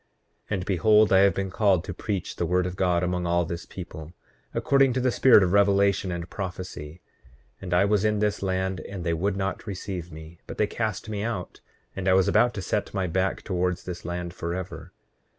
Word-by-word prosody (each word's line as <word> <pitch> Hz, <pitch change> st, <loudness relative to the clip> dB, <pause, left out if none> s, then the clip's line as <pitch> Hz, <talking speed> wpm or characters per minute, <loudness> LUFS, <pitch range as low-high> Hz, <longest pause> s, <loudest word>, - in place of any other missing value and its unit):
8:24 -, -, -44 dB
And 90 Hz, -1 st, -4 dB
behold, 105 Hz, +3 st, +4 dB
I 95 Hz, -, +7 dB
have 100 Hz, -2 st, +4 dB
been 95 Hz, -1 st, -2 dB
called 95 Hz, -4 st, +2 dB
to -, -, -6 dB
preach 100 Hz, -5 st, -4 dB
the 85 Hz, -, 0 dB
word 90 Hz, +1 st, +2 dB
of 90 Hz, 0 st, -4 dB
God 90 Hz, -2 st, +1 dB
among 90 Hz, 0 st, -1 dB
all 85 Hz, 0 st, +2 dB
this 85 Hz, 0 st, -6 dB
people, 85 Hz, -3 st, -9 dB, 0.4 s
according 135 Hz, -2 st, +3 dB
to 130 Hz, -, 0 dB
the 125 Hz, 0 st, +2 dB
spirit 120 Hz, -4 st, +6 dB
of 90 Hz, -, +1 dB
revelation 100 Hz, -1 st, +3 dB
and 85 Hz, -1 st, -4 dB
prophecy; 90 Hz, -4 st, -7 dB, 0.6 s
and 95 Hz, -2 st, -6 dB
I 90 Hz, +3 st, +4 dB
was 105 Hz, 0 st, +2 dB
in 105 Hz, 0 st, +2 dB
this 105 Hz, 0 st, 0 dB
land 95 Hz, -1 st, -1 dB
and 95 Hz, -3 st, -7 dB
they 85 Hz, 0 st, 0 dB
would 95 Hz, +4 st, -1 dB
not 95 Hz, +3 st, -3 dB
receive 90 Hz, -3 st, -5 dB
me, 80 Hz, +2 st, -11 dB
but -, -, -8 dB
they 105 Hz, -, +3 dB
cast 110 Hz, 0 st, -3 dB
me 105 Hz, -2 st, -3 dB
out 110 Hz, -5 st, -4 dB, 0.3 s
and 95 Hz, -1 st, -4 dB
I 95 Hz, -, +5 dB
was 95 Hz, 0 st, +4 dB
about 120 Hz, +4 st, +3 dB
to 95 Hz, -, -4 dB
set 105 Hz, +2 st, -2 dB
my 95 Hz, -1 st, 0 dB
back 95 Hz, +2 st, -1 dB
towards 90 Hz, -1 st, -1 dB
this 90 Hz, -1 st, -7 dB
land 85 Hz, 0 st, -4 dB
forever. 85 Hz, 0 st, -5 dB
95 Hz, 210 wpm, -26 LUFS, 90-100 Hz, 0.6 s, I